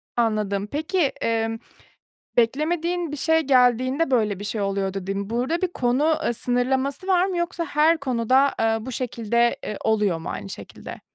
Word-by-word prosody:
Anladım. 210 Hz, -3 st, 0 dB
Peki, 315 Hz, -, -3 dB, 0.2 s
emm, 225 Hz, 0 st, 0 dB, 0.8 s
beklemediğin 320 Hz, +7 st, +1 dB
bir 295 Hz, -, -4 dB
şey 320 Hz, +3 st, +3 dB
geldiğinde 260 Hz, +2 st, +3 dB
böyle 210 Hz, -5 st, +1 dB
bir -, -, -6 dB
şey 210 Hz, 0 st, -3 dB
oluyordu 195 Hz, -1 st, -1 dB
dedin. 195 Hz, +2 st, -4 dB
Burada 255 Hz, +10 st, -1 dB
bir 370 Hz, -, +2 dB
konu, 270 Hz, +6 st, +2 dB
eee, 240 Hz, -, +1 dB
sınırlaması 260 Hz, -, -1 dB
var 365 Hz, -1 st, +4 dB
mı 375 Hz, -2 st, -2 dB
yoksa 345 Hz, -1 st, -2 dB
her 310 Hz, +3 st, +3 dB
konuda, 260 Hz, 0 st, +2 dB
eee, 225 Hz, 0 st, +2 dB
bu 260 Hz, -, -5 dB
şekilde, 235 Hz, -1 st, 0 dB
eee, 210 Hz, -, -4 dB
oluyor 210 Hz, -6 st, +2 dB
mu 160 Hz, -, -6 dB
aynı 100 Hz, -, -6 dB
şekilde? -, -, -9 dB
245 Hz, 160 wpm, -23 LUFS, 220-305 Hz, 0.8 s, var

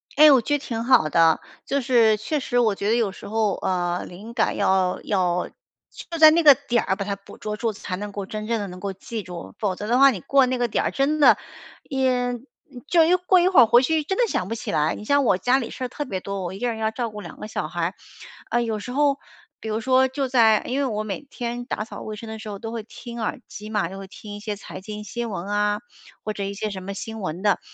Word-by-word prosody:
哎， 300 Hz, +1 st, +8 dB
我 265 Hz, -3 st, +6 dB
觉 290 Hz, +6 st, +1 dB
得 -, -, -11 dB
挺 230 Hz, -4 st, -4 dB
好 240 Hz, -10 st, +4 dB
的。 165 Hz, +1 st, +4 dB, 0.3 s
就 280 Hz, +1 st, 0 dB
是 230 Hz, -4 st, +4 dB
确 290 Hz, +8 st, -2 dB
实 245 Hz, -2 st, -2 dB
我 225 Hz, -4 st, +3 dB
觉 200 Hz, +1 st, -2 dB
得 225 Hz, -, +3 dB
有 225 Hz, -4 st, +1 dB
时 -, -, -11 dB
候， 215 Hz, -1 st, +1 dB
呃， 175 Hz, -1 st, -1 dB
灵 205 Hz, +6 st, -10 dB
感 230 Hz, -2 st, +1 dB
要 185 Hz, -1 st, +2 dB
要 180 Hz, -3 st, 0 dB, 0.6 s
就 335 Hz, -, -4 dB
在 315 Hz, -1 st, +9 dB
那 335 Hz, +2 st, +3 dB
个 295 Hz, -4 st, +9 dB
点 245 Hz, -4 st, 0 dB
儿， 190 Hz, -, 0 dB
把 200 Hz, 0 st, -4 dB
它 200 Hz, 0 st, -2 dB
捕 200 Hz, 0 st, -15 dB
捉 210 Hz, 0 st, -4 dB
住， 225 Hz, +1 st, -1 dB
才 200 Hz, -2 st, -5 dB
能 205 Hz, +1 st, -6 dB
够 200 Hz, -1 st, -5 dB
真 215 Hz, +2 st, -6 dB
正 230 Hz, -1 st, 0 dB
地 205 Hz, -, -3 dB
能 180 Hz, -1 st, -9 dB
够 195 Hz, +1 st, -4 dB
记 220 Hz, +4 st, -6 dB
住。 180 Hz, -3 st, -9 dB
否 200 Hz, -4 st, 0 dB
则 205 Hz, -, -6 dB
的 245 Hz, +3 st, +2 dB
话， 275 Hz, 0 st, +8 dB
你 225 Hz, -8 st, -2 dB
过 275 Hz, +5 st, +4 dB
那 255 Hz, 0 st, -1 dB
个 245 Hz, 0 st, +1 dB
点 225 Hz, -, -1 dB
儿， -, -, 0 dB
真 290 Hz, +3 st, +1 dB
的 290 Hz, -, +7 dB, 0.5 s
也 255 Hz, -2 st, 0 dB, 0.5 s
就 335 Hz, -1 st, +5 dB
一 340 Hz, -, +3 dB
过 365 Hz, +1 st, +3 dB
一 350 Hz, -, +3 dB
会 370 Hz, -6 st, +5 dB
儿 -, -, +8 dB
回 240 Hz, +3 st, +6 dB
去 315 Hz, +2 st, +1 dB
真 385 Hz, +6 st, -2 dB
的 -, -, +4 dB
想 185 Hz, -, -1 dB
不 225 Hz, -, -3 dB
起 -, -, -5 dB
来。 150 Hz, +1 st, +1 dB
你 -, -, -9 dB
像 285 Hz, +4 st, +3 dB
我 205 Hz, -7 st, +3 dB
家 250 Hz, +7 st, +2 dB
里 235 Hz, -, -4 dB
事 -, -, -7 dB
儿 -, -, -1 dB
特 295 Hz, +4 st, -5 dB
别 195 Hz, -8 st, -3 dB
多， 195 Hz, 0 st, -5 dB
我 175 Hz, 0 st, -4 dB
一 195 Hz, -, -8 dB
个 245 Hz, -, -1 dB
人 225 Hz, -, -3 dB
要 220 Hz, 0 st, +1 dB
照 230 Hz, 0 st, -3 dB
顾 210 Hz, 0 st, -8 dB
2 175 Hz, -, -10 dB
个 -, -, -6 dB
小 220 Hz, -, -3 dB
孩。 -, -, -2 dB, 0.6 s
唉， 240 Hz, -, +2 dB
有 225 Hz, -2 st, -2 dB
时 245 Hz, -, -7 dB
候 280 Hz, +1 st, +2 dB, 0.4 s
比 -, -, -8 dB
如 215 Hz, +1 st, -1 dB
说 260 Hz, +2 st, +4 dB
就 265 Hz, +1 st, -2 dB
在 225 Hz, -4 st, +4 dB
因 260 Hz, +3 st, -1 dB
为 280 Hz, -, +1 dB
我 215 Hz, -4 st, -2 dB
每 205 Hz, +2 st, -4 dB
天 245 Hz, -3 st, -5 dB
打 225 Hz, -, -3 dB
扫 -, -, -9 dB
卫 215 Hz, -, -6 dB
生 225 Hz, +2 st, -9 dB
的 220 Hz, 0 st, -6 dB
时 220 Hz, -, -9 dB
候， 200 Hz, -1 st, -6 dB
都 225 Hz, +1 st, -6 dB
会 230 Hz, -2 st, -4 dB
听 235 Hz, +2 st, -9 dB
耳 220 Hz, -, -3 dB
机 210 Hz, +1 st, -9 dB
嘛， 210 Hz, -5 st, 0 dB
就 195 Hz, -, -8 dB
会 195 Hz, 0 st, -8 dB
听 205 Hz, +2 st, -10 dB
一 -, -, -8 dB
些 210 Hz, 0 st, -4 dB
财 200 Hz, -, -9 dB
经 210 Hz, +1 st, -7 dB
新 230 Hz, +4 st, -4 dB
闻 190 Hz, -4 st, -5 dB
啊， 205 Hz, 0 st, +1 dB, 0.4 s
或 215 Hz, -, -2 dB
者 200 Hz, -, -4 dB
一 200 Hz, 0 st, -3 dB
些 215 Hz, +2 st, -3 dB
什 195 Hz, -2 st, -6 dB
么 200 Hz, +1 st, -5 dB
新 220 Hz, +3 st, -6 dB
闻 180 Hz, -1 st, -4 dB
的。 205 Hz, -1 st, +2 dB
220 Hz, 295 characters per minute, -23 LUFS, 200-255 Hz, 0.6 s, 在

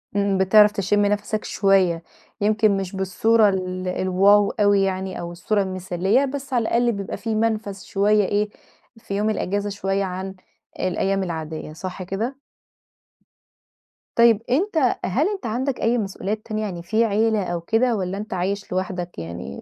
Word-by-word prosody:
امم، 200 Hz, -1 st, +1 dB
بتعرف 210 Hz, +2 st, +6 dB
تشم 205 Hz, +1 st, +1 dB
نفَسَك 210 Hz, +1 st, -1 dB
شوية، 185 Hz, -4 st, +2 dB, 0.4 s
يمكن 210 Hz, -1 st, +3 dB
مش 195 Hz, 0 st, -4 dB
بالصورة 205 Hz, +3 st, +3 dB
ال 185 Hz, -1 st, -3 dB
الواو 195 Hz, +3 st, +3 dB
أوي 205 Hz, -2 st, +3 dB
يعني 190 Hz, -1 st, -2 dB
أو 170 Hz, 0 st, -5 dB
الصورة 200 Hz, +4 st, 0 dB
المثالية، 190 Hz, +6 st, 0 dB
بس 275 Hz, 0 st, -6 dB
على 240 Hz, -, +3 dB
الأقل 240 Hz, +1 st, +2 dB
بيبقى 200 Hz, -3 st, -5 dB
في 225 Hz, -1 st, -3 dB
منفذ 215 Hz, -3 st, -1 dB
شوية 205 Hz, +1 st, +2 dB
إيه، 205 Hz, +2 st, 0 dB, 0.5 s
في 200 Hz, -3 st, -6 dB
يوم 210 Hz, +1 st, +1 dB
الأجازة 205 Hz, -1 st, -1 dB
شوية 195 Hz, 0 st, -1 dB
عن 190 Hz, +1 st, -5 dB, 0.4 s
الأيام 190 Hz, +1 st, 0 dB
العادية. 160 Hz, -3 st, -5 dB
صح 185 Hz, +3 st, -6 dB
كده؟ 220 Hz, +9 st, -3 dB, 1.8 s
طيب، 235 Hz, -2 st, +5 dB
أنت 310 Hz, -, +2 dB
هل 270 Hz, -, +1 dB
أنت 400 Hz, -10 st, -5 dB
عندك 255 Hz, +4 st, -2 dB
أي 235 Hz, +2 st, +2 dB
مسؤوليات 210 Hz, 0 st, -3 dB
تانية، 215 Hz, -1 st, -3 dB
يعني 180 Hz, -5 st, -4 dB
في 220 Hz, +6 st, +2 dB
عيلة 215 Hz, -1 st, +1 dB
أو 175 Hz, -1 st, -3 dB
كده 230 Hz, +6 st, +1 dB
والّا 190 Hz, -1 st, -3 dB
أنت 210 Hz, 0 st, -6 dB
عايش 190 Hz, +2 st, -2 dB
لوحدك 180 Hz, -, -3 dB
يعني؟ 85 Hz, -5 st, -7 dB
200 Hz, 155 wpm, -22 LUFS, 185-220 Hz, 1.8 s, بتعرف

